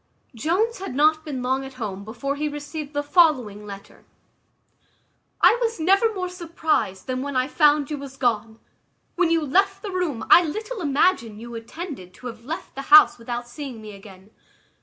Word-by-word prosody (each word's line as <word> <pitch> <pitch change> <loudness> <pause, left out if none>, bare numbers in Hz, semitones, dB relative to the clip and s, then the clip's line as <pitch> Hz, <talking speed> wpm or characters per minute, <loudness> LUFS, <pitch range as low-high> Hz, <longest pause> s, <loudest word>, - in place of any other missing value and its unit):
Jones 370 - 0
had 380 -9 -6
not 310 +2 +3
been 275 -5 -5
long 260 +2 0
at 265 -1 -10
home 200 -5 -5
before 240 +6 -4
he 300 +1 -2
received 295 0 -7
the 290 0 -1
following 260 - +2
letter: 200 -1 -11 1.4
"I 475 - +6
was 455 -3 -1
never 390 +7 +3
more 365 -1 -2
surprized 325 - -2
than 255 -1 -3
when 280 0 -4
I 255 0 +1
found 295 -1 +3
you 295 - -3
was 270 -1 -9
gone. 230 -3 -1 0.6
When 360 -2 +2
you 330 -2 +1
left 390 +7 +1
the 410 - -4
room 345 -11 -2
I 350 - +9
little 430 +7 -5
imagined 280 - +1
you 235 +1 -9
intended 230 - -8
to - - -15
have 235 -1 -8
left 320 +5 -6
the 275 - -6
house 305 -4 +8
without 240 +1 -5
seeing 255 -1 -8
me 215 -1 -9
again. 195 0 -14
285 Hz, 180 wpm, -23 LUFS, 235-335 Hz, 1.4 s, I